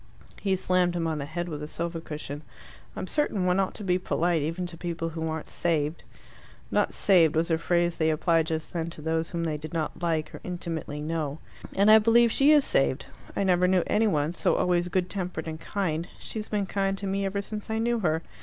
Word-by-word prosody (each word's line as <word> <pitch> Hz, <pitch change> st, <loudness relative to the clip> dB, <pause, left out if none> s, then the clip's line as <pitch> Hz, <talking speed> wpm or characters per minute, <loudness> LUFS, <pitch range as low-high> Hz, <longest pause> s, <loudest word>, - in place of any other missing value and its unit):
He 195 Hz, -2 st, +2 dB
slammed 180 Hz, -1 st, +1 dB
him 170 Hz, -1 st, -1 dB
on 160 Hz, -2 st, -1 dB
the 140 Hz, -, -3 dB
head 175 Hz, +3 st, -3 dB
with 150 Hz, -3 st, -5 dB
a 150 Hz, -, -5 dB
sofa 165 Hz, +1 st, -3 dB
cushion. 150 Hz, -2 st, -6 dB, 0.5 s
"I'm -, -, -4 dB
certain 205 Hz, -6 st, 0 dB
one 180 Hz, +1 st, +2 dB
ought 195 Hz, -, 0 dB
to 210 Hz, -, -6 dB
be 180 Hz, -1 st, +1 dB
polite, 170 Hz, -2 st, +1 dB
even 165 Hz, +5 st, -2 dB
to 175 Hz, -1 st, -7 dB
people 165 Hz, -1 st, -3 dB
who 160 Hz, 0 st, -3 dB
aren't 160 Hz, -1 st, -4 dB
saved." 155 Hz, -2 st, 0 dB, 0.7 s
("Not -, -, +2 dB
saved" 170 Hz, -6 st, +4 dB
was 165 Hz, +2 st, +1 dB
a 160 Hz, -, +2 dB
phrase 175 Hz, 0 st, +1 dB
they 160 Hz, 0 st, +3 dB
applied 160 Hz, +1 st, +2 dB
just 160 Hz, -1 st, -3 dB
then 165 Hz, -1 st, -2 dB
to 160 Hz, -, -9 dB
those 160 Hz, 0 st, 0 dB
whom 170 Hz, -1 st, -3 dB
they 155 Hz, -2 st, -1 dB
did 155 Hz, +3 st, -8 dB
not 160 Hz, -2 st, -3 dB
like 160 Hz, -3 st, -1 dB
or -, -, -7 dB
intimately 165 Hz, -4 st, -4 dB
know.) 155 Hz, -2 st, -2 dB, 0.4 s
"And 200 Hz, +2 st, +5 dB
I 220 Hz, -, +9 dB
believe 230 Hz, +1 st, +5 dB
she 275 Hz, +5 st, +5 dB
is 295 Hz, -2 st, +6 dB
saved. 135 Hz, 0 st, +1 dB, 0.3 s
I -, -, +1 dB
never 180 Hz, -1 st, +3 dB
knew 185 Hz, -1 st, +3 dB
any 220 Hz, +1 st, +2 dB
one 150 Hz, -5 st, +1 dB
so 175 Hz, -, +1 dB
always 175 Hz, 0 st, +1 dB
good 180 Hz, 0 st, 0 dB
tempered 180 Hz, -4 st, -4 dB
and 160 Hz, 0 st, -6 dB
kind. 175 Hz, -5 st, -2 dB
She's 215 Hz, -1 st, -6 dB
been 205 Hz, -2 st, 0 dB
kind 195 Hz, 0 st, -1 dB
to 200 Hz, -, -5 dB
me 195 Hz, +1 st, -1 dB
ever 200 Hz, +1 st, -1 dB
since 210 Hz, +1 st, -6 dB
I 220 Hz, -, 0 dB
knew 235 Hz, +1 st, +1 dB
her. 160 Hz, -4 st, 0 dB
175 Hz, 225 wpm, -27 LUFS, 160-195 Hz, 0.7 s, I